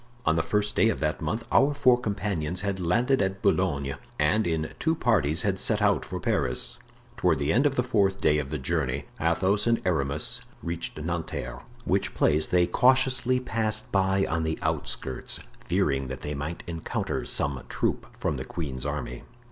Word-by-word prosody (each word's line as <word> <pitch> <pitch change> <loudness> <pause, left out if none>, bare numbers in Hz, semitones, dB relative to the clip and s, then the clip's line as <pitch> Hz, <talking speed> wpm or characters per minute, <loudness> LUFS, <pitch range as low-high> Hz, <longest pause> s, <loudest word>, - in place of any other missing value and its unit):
On 80 - +3
the 80 - +2
first 105 +5 0
day 115 - +4
of 110 - -1
that 75 0 -1
month 115 +1 -2
our 145 +1 +4
four 130 -3 +5
companions 100 -7 -2
had 100 -1 -2
landed 120 +10 +2
at 95 0 -2
Boulogne, 70 -1 +1 0.2
and, 95 +8 +2
in 80 -2 -1
two 160 0 +1
parties, 95 - +2
had 95 -3 0
set - - +2
out - - +2
for - - -5
Paris. - - 0 0.4
Toward - - +2
the 70 +2 +1
end 130 +7 +4
of 140 - -2
the 125 - +2
fourth 100 -6 +1
day 75 0 +3
of 70 -2 -4
the 75 - -2
journey 70 -1 -1
Athos 95 +7 +1
and 115 0 +3
Aramis 75 -4 0 0.2
reached 85 -1 -4
Nanterre, 75 -7 -4 0.2
which - - 0
place 75 0 +3
they 90 -1 +3
cautiously 130 +2 +3
passed 110 -3 -2
by 95 0 +2
on 80 0 -1
the 80 0 -1
outskirts, 65 - -1 0.3
fearing 70 -2 +1
that 65 0 -6
they 75 - -4
might 75 +4 -5
encounter 80 -2 -3
some 70 -2 +1
troop - - -1
from - - -1
the - - -4
queen's 70 -5 -5
army. 65 -4 -4
85 Hz, 180 wpm, -27 LUFS, 75-105 Hz, 0.4 s, four